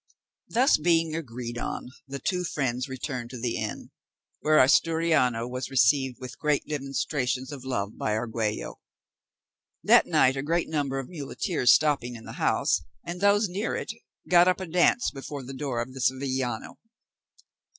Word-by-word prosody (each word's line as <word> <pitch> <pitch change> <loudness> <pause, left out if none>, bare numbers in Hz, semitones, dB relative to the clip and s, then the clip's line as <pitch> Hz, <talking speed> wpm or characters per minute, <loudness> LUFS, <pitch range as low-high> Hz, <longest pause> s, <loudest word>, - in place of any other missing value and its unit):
This 255 - +3
being 165 -1 +2
agreed 120 -5 -5
on, - - -4 0.2
the 140 +1 -5
two 180 +6 -1
friends 130 -5 -2
returned 130 -2 -5
to 125 - -8
the 120 0 -2
inn, - - -5 0.5
where 155 0 +3
Asturiano 140 -5 +3
was 125 0 -4
received 130 +1 +3
with 130 -1 -9
great 150 -2 +1
demonstrations 135 -2 -2
of 140 -3 -8
love 105 -6 -3
by 105 - 0
Argüello. 110 - -3 1.1
That - - +6
night 130 +1 +4
a 135 - -2
great 165 +4 0
number 145 -4 -1
of 135 -2 -4
muleteers 150 - 0
stopping 145 -6 +2
in 115 - -11
the - - -8
house, - - +2 0.2
and 175 +2 -6
those 200 +1 +4
near 195 +5 -2
it, - - -4 0.3
got 175 0 +6
up 185 - +2
a 190 - -4
dance 180 +8 +2
before 140 0 -7
the 130 +2 -8
door 130 -3 -3
of 125 +2 -4
the 130 - -7
Sevillano. 130 -2 -1
135 Hz, 160 wpm, -27 LUFS, 125-160 Hz, 1.1 s, That